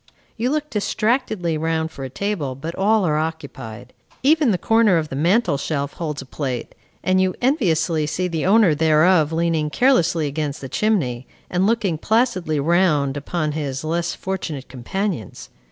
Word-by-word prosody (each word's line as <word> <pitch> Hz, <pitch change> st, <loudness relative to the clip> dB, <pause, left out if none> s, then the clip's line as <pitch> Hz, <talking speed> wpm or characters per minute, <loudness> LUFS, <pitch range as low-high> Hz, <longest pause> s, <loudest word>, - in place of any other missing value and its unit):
You 235 Hz, +3 st, -1 dB
look 300 Hz, +1 st, -2 dB
distractedly 215 Hz, -, 0 dB
round 160 Hz, 0 st, -1 dB
for 135 Hz, -, -8 dB
a 135 Hz, -, -4 dB
table, 155 Hz, -4 st, -3 dB
but 160 Hz, +5 st, -6 dB
all 205 Hz, +2 st, +2 dB
are 155 Hz, -2 st, +1 dB
occupied. 135 Hz, -7 st, -6 dB, 0.3 s
Even 300 Hz, -1 st, +4 dB
the 195 Hz, -, +2 dB
corner 225 Hz, -2 st, +3 dB
of 155 Hz, -2 st, -2 dB
the -, -, -5 dB
mantel 170 Hz, -, +2 dB
shelf 140 Hz, -1 st, -2 dB
holds 150 Hz, -4 st, -4 dB
a -, -, -15 dB
plate, 130 Hz, -2 st, -4 dB, 0.3 s
and 185 Hz, 0 st, +3 dB
you 185 Hz, -1 st, +1 dB
enviously 165 Hz, -, +1 dB
see 180 Hz, +4 st, -1 dB
the 165 Hz, -3 st, -2 dB
owner 205 Hz, -4 st, +5 dB
thereof 155 Hz, +1 st, +4 dB
leaning 165 Hz, -2 st, 0 dB
carelessly 175 Hz, -, +2 dB
against 145 Hz, 0 st, -3 dB
the 135 Hz, -, -7 dB
chimney, 135 Hz, -, 0 dB, 0.2 s
and 185 Hz, +2 st, +2 dB
looking 210 Hz, -8 st, 0 dB
placidly 185 Hz, -, +1 dB
round 150 Hz, -3 st, +2 dB
upon 150 Hz, +2 st, -2 dB
his 145 Hz, -3 st, -3 dB
less 170 Hz, +2 st, -1 dB
fortunate 170 Hz, -8 st, -4 dB
companions. 135 Hz, -, -4 dB
165 Hz, 160 wpm, -21 LUFS, 150-195 Hz, 0.3 s, owner